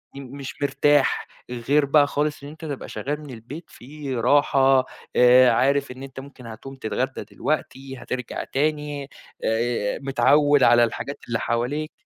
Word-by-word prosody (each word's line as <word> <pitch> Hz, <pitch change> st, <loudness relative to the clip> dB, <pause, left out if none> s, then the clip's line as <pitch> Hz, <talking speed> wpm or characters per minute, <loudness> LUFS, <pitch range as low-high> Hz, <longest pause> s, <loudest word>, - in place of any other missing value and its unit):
م 140 Hz, 0 st, -9 dB
مش 140 Hz, -2 st, -7 dB
مرتاح، 140 Hz, 0 st, +2 dB, 0.2 s
غير 130 Hz, +5 st, +1 dB
بقى 145 Hz, +1 st, +4 dB
خالص 145 Hz, 0 st, -2 dB
إن 140 Hz, -, -8 dB
أنت 160 Hz, +2 st, -10 dB
تبقى 145 Hz, -3 st, -6 dB
شغّال 145 Hz, +2 st, -4 dB
من 150 Hz, -, -11 dB
البيت 125 Hz, +8 st, -9 dB
في 140 Hz, +1 st, -7 dB
راحة، 135 Hz, +1 st, +3 dB, 0.3 s
آآ 125 Hz, 0 st, +7 dB
عارف 140 Hz, +3 st, +1 dB
إن 130 Hz, +1 st, -9 dB
أنت 135 Hz, -1 st, -9 dB
ممكن 135 Hz, -2 st, -12 dB
هتقوم 115 Hz, +4 st, -9 dB
تتغدى 130 Hz, +1 st, -3 dB
دلوقتي، 135 Hz, +5 st, -4 dB
هترجع 125 Hz, -1 st, -5 dB
تاني، 145 Hz, -1 st, -2 dB, 0.3 s
آآ 115 Hz, -2 st, -1 dB
متعوّد 145 Hz, +1 st, +3 dB
على 120 Hz, 0 st, +6 dB
الحاجات 130 Hz, +4 st, -3 dB
اللي 115 Hz, -1 st, -1 dB
حواليك. 125 Hz, +7 st, -2 dB
135 Hz, 150 wpm, -23 LUFS, 125-145 Hz, 0.3 s, آآ